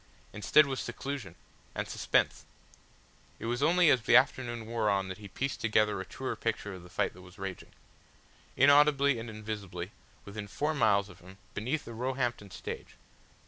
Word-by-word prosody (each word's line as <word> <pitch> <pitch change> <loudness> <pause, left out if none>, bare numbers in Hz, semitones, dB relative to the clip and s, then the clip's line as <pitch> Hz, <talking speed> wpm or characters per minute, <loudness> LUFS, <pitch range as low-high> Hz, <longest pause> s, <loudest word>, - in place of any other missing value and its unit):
Instead 125 +8 +5
was 135 -2 -3
seclusion 130 -10 -5 0.4
and - - -2
suspense. - - +1 0.9
It - - -7
was 120 +2 -1
only 170 +1 +5
as 130 - +4
the 110 - +4
afternoon 125 -3 +3
wore 115 -1 0
on 95 -1 +1
that 95 - -6
he 105 - -9
pieced 135 +7 -3
together 105 -2 +2
a - - -6
truer 130 - -4
picture 105 -3 -2
of 95 - -9
the 90 - -13
fight - - 0
that 90 - -14
was 90 +2 -15
raging, 95 -2 -6 0.9
inaudibly 140 -1 +5
and 115 +1 -6
invisibly, 105 -4 -6 0.3
within 105 0 -6
four 150 +9 -1
miles 100 -9 +3
of 90 -1 -14
him, 90 +2 -14 0.2
beneath 130 +9 -2
the 115 - -8
Roehampton 120 -3 -2
stage. - - -7
110 Hz, 170 wpm, -31 LUFS, 100-135 Hz, 0.9 s, Instead